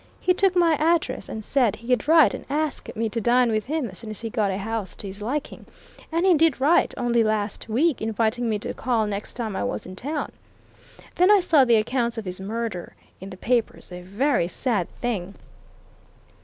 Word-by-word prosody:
He 365 - +2
took 375 0 +2
my 340 -2 +4
address 330 +2 0
and 220 -1 -6
said 250 -7 +2
he'd 250 +4 -1
write 320 -1 +6
and - - -6
ask 300 +1 -2
me 225 +1 -1
to 230 +2 -3
dine 240 +1 +3
with 215 -1 -1
him 300 -2 -2
as 185 -3 -9
soon 225 - -8
as 215 - -7
he 225 -1 -5
got 215 -4 0
a 190 - -2
house 210 -2 -4
to - - -10
his 200 +1 -8
liking, 270 +8 -4 0.4
and 335 +3 +1
he 375 - +6
did 320 -4 +3
write, 295 +6 +3
only 235 -1 +2
last 215 0 -1
week, 275 +6 +1
inviting 225 +2 0
me 215 - 0
to 205 - -5
call 230 -3 0
next 205 0 -5
time 225 -5 -4
I - - -2
was 105 +1 -3
in 185 - -9
town. 290 +8 -4 0.9
Then 360 +2 +5
I 415 -1 +7
saw 320 -7 +4
the 235 -2 +4
accounts 235 +2 0
of 225 - -5
his 180 0 -5
murder 215 -2 -5 0.2
in 190 - -8
the 185 - -10
papers 235 -3 -1
a 180 0 -7
very 205 +2 0
sad 200 -1 -1
thing!" 200 -6 -3
230 Hz, 210 wpm, -24 LUFS, 210-285 Hz, 0.9 s, I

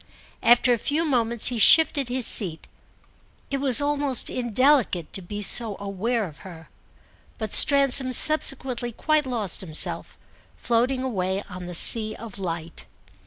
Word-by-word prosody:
After 245 +1 +2
a 235 - -3
few 305 +8 -3
moments 235 -5 -2
he 245 -2 -5
shifted 285 +1 +3
his 250 -1 0
seat; 170 -8 +3 0.8
it 275 - -3
was 265 -4 +2
almost 285 -2 -3
indelicate 245 - -1
to 195 - -8
be 205 +3 -7
so 220 0 -2
aware 205 +3 -4
of 155 -6 -14
her. 165 -4 -14 0.7
But 215 -2 -7
Stransom 275 -2 +4
subsequently 260 -3 +2
quite 310 +3 -2
lost 220 -8 -6
himself, 160 -5 -2 0.4
floating 250 +2 -2
away 195 -5 -4
on 180 -1 -11
the 180 - -6
sea 215 +4 +6
of 215 -3 -12
light. 165 -3 -8
235 Hz, 140 wpm, -22 LUFS, 195-265 Hz, 0.8 s, sea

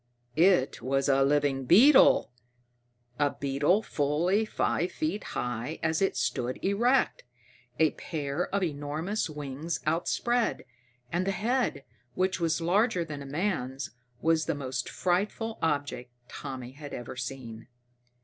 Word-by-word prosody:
It 170 -7 +3
was 135 +3 0
a 135 -1 +4
living 140 -1 +1
beetle! 240 - +6 0.9
A 145 -1 +1
beetle 145 +9 +2
fully 170 +8 +1
five 180 -4 0
feet 310 -9 -2
high 125 +6 -3
as 160 +1 +1
it 195 - +1
stood 125 +1 -1
erect, 235 +7 +2 0.5
a 160 -1 +4
pair 150 +1 -3
of 200 -1 -1
enormous 160 +6 -2
wings 150 +2 -4
outspread. 225 +9 0 0.5
And 180 +3 0
the - - +2
head, 225 - 0 0.3
which 185 +1 0
was 165 -1 +1
larger 180 +1 +2
than 150 -3 -6
a 140 - -8
man's, 135 - -2 0.3
was 160 -1 +2
the 165 - -1
most 130 -3 -4
frightful 210 +5 -1
object 145 -5 -1 0.2
Tommy 130 -3 -7
had 145 +1 -8
ever 120 0 -7
seen. 125 -3 -6
155 Hz, 130 wpm, -29 LUFS, 135-185 Hz, 0.9 s, beetle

